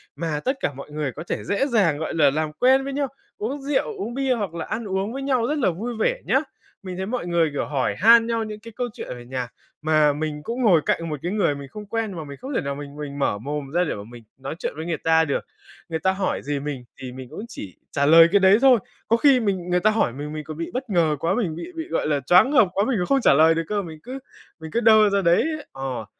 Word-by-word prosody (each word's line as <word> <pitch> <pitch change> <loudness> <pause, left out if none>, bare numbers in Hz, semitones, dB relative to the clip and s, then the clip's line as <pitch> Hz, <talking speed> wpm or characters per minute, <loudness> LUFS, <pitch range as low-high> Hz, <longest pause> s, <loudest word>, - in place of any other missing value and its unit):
mà 155 0 -2
tất 265 +1 0
cả 145 - -1
mọi 140 +2 -10
người 150 -2 -2
có 150 - -8
thể - - -2
dễ 235 +8 0
dàng, 195 - +2
gọi 160 - -4
là, 145 -4 +4
làm 155 +1 -1
quen 260 - +4
với 275 0 -4
nhau, 280 0 0 0.3
uống 265 +7 -4
rượu, 290 - -1
uống 240 -11 -4
bia, 270 -1 +1
hoặc 200 -7 -3
là 170 - -4
ăn 220 +1 -4
uống 195 +3 -2
với 275 - -4
nhau 255 -4 +1
rất 300 +3 -1
là 240 - +3
vui 225 +7 -5
vẻ - - +1
nhá. - - +3 0.4
Mình 185 -2 -6
thấy 190 - -3
mọi 235 -3 -3
người, 170 -2 +2
kiểu, 140 - -1
hỏi 140 -3 -1
han 230 +2 +7
nhau 230 -1 0
những 215 -1 -7
cái 230 +1 -12
câu 245 - -2
chuyện - - -8
ở 125 - -7
nhà, 125 0 -4 0.3
mà 155 -1 +3
mình 150 0 -4
cũng 235 +8 -4
ngồi 175 -8 +5
cạnh 165 0 0
một 150 -2 -4
cái 175 - -2
người 190 -9 +1
mình 140 -1 -8
không 210 +8 -9
quen 225 0 -2
mà 160 - -5
mình 140 -2 -9
không 270 +2 -6
thể - - +1
nào 140 0 -3
mình 145 0 -9
mình 145 -1 -6
mở 120 - +1
mồm 140 +3 -5
ra 175 +1 +3
để 170 - -2
mà 100 - -7
mình 120 -1 -12
nói 135 +3 -6
chuyện - - -3
với 160 - -5
người 170 -2 -2
ta 160 +1 +3
được. 140 - -2 0.4
Người 160 -1 -2
ta 190 - +2
hỏi 190 0 -2
gì 145 0 -2
mình 140 -3 -5 0.2
thì 130 - -6
mình 130 -1 -9
cũng 220 - -7
chỉ 95 - -9
trả 140 - +1
lời 165 +2 +8
cái 200 - +5
đấy 190 +2 +6
thôi, 260 -4 +6 0.3
có 230 - +3
khi 270 0 +5
mình 190 -6 -2
người 180 0 +2
ta 215 - +3
hỏi 215 - +1
mình, 145 +3 -6
mình 155 0 -5
còn 155 +1 -8
bị 165 - -4
bất 255 0 -4
ngờ 165 -5 +2
quá, 170 +6 0
mình 185 -10 -1
bị 335 - -7
bị, 325 +1 -5
gọi - - -1
là, 145 -2 +1
choáng 180 - +5
ngợp 250 -8 +5
quá. 200 +2 +1
Mình 260 - +1
còn 180 - 0
không 275 -1 +2
trả - - +5
lời 160 +3 +5
được 165 - -1
cơ, 205 -1 0
mình 160 -4 -9
cứ 260 +2 -7 0.4
mình 160 0 -9
cứ 235 - +1
đơ 220 -2 +6
ra 200 0 +1
đấy. 170 -1 +4 0.3
Ờ. 135 -4 -5
175 Hz, 285 wpm, -23 LUFS, 150-230 Hz, 0.4 s, lời